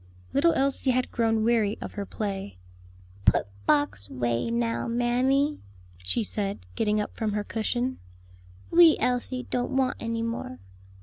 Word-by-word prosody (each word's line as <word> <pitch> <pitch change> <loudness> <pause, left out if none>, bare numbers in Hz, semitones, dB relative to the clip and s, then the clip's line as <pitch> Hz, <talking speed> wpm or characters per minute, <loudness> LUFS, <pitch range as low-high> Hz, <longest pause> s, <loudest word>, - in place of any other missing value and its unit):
Little 330 +5 +4
Elsie 270 0 +1
had 255 0 +1
grown 225 -2 +1
weary 220 -3 +2
of - - -6
her 200 -2 -5
play. 195 - -4 0.7
"Put - - +4 0.2
box 100 -10 +1
way 120 - -1
now, 235 0 -1
mammy," 255 +5 +1 0.4
she 90 - -1
said, 200 - -3
getting 210 -1 +1
up 210 - -4
from 215 -2 -1
her 210 0 -1
cushion; 240 +4 -2 0.7
"wee 335 -2 +7
Elsie 250 +1 0
don't 250 +2 -1
want 260 -2 +1
any 230 0 -2
more. 230 - -4
230 Hz, 140 wpm, -27 LUFS, 205-255 Hz, 0.7 s, wee